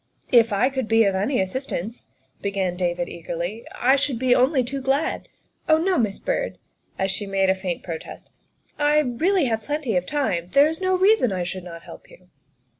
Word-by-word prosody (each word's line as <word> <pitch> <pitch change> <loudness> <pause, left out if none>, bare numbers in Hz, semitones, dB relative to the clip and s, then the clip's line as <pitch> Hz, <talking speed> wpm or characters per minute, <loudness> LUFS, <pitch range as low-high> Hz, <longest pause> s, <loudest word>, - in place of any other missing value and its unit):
' - - -47
' - - -41
" - - -25
If 230 0 -5
I 205 +6 +2
could 260 -4 -2
be 225 0 +4
of 200 -2 +2
any 205 +8 0
assistance," 215 +1 -4 0.3
began 195 -3 -1
David 175 -1 -1
eagerly, 170 +6 -5
" - - -11 0.2
I - - +6
should 275 -3 -1
be 255 +1 +3
only 260 +2 +3
too 270 +3 -4
glad. 270 +4 -1 0.4
Oh, 315 - +6
no, 360 +2 +1
Miss 210 -4 0
Byrd," - - -2 0.4
as 190 0 0
she 205 +1 -2
made 195 -1 +2
a - - +4
faint 185 -2 -4
protest, 165 -3 -8 0.3
" - - -38
I 295 0 +3
have 290 - +1
plenty 290 -4 -2
of 180 0 +1
time 190 - -1
there 280 +1 +7
is 320 +3 -4
no 370 0 +2
reason 380 - +4
I 185 -2 -1
should 180 +1 -5
not 170 -2 -10
help - - -13
you. 180 0 -19
230 Hz, 210 wpm, -23 LUFS, 190-285 Hz, 0.4 s, there